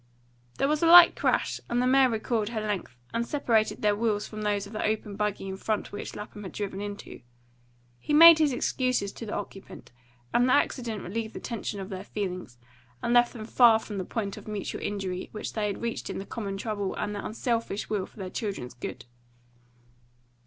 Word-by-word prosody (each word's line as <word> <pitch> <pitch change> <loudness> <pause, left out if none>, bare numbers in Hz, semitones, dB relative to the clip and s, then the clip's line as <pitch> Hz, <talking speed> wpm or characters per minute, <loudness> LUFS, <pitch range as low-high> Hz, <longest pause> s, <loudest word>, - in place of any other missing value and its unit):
There - - +2
was 300 +1 +1
a 335 - +4
light 345 0 +10
crash, - - 0
and 240 - +1
the 250 - +2
mare 260 0 +5
recoiled 220 -1 -1
her 230 -2 -3
length, 205 - -3 0.2
and 230 - 0
separated 235 -6 0
their 210 -1 +3
wheels 210 -1 0
from 215 -1 -7
those 205 -1 0
of 205 - -12
the 215 - -3
open 215 -1 -1
buggy 210 -1 -2
in 190 0 -5
front 215 +1 -2
which 205 - -6
Lapham 210 0 -8
had 190 - -8
driven 200 -1 -4
into. 205 -7 -7 0.8
He - - -5
made 325 +2 +10
his 305 -3 +3
excuses 255 -4 0
to 230 - -8
the - - -3
occupant; 195 -11 -8 0.4
and 245 +1 +4
the - - +5
accident 240 -7 0
relieved 220 +4 -4
the - - -4
tension 220 -3 -4
of 190 0 -6
their 190 -2 -6
feelings, 180 - -5 0.5
and 235 - +1
left 240 0 +5
them 220 -3 -7
far 235 -1 +6
from 210 -2 -6
the - - -2
point 200 0 -4
of - - -11
mutual 210 -3 -4
injury 190 -3 -3
which 215 - -5
they 215 -2 -1
had 205 +2 -4
reached 235 0 -3
in - - -4
their 195 - -5
common 200 -3 -5
trouble 205 -2 -3
and 210 - -3
their 205 - -5
unselfish 230 -2 -2
will 205 -3 -2
for - - -23
their 190 -3 -6
children's 195 - -4
good. 120 - -7
215 Hz, 205 wpm, -27 LUFS, 200-235 Hz, 0.8 s, light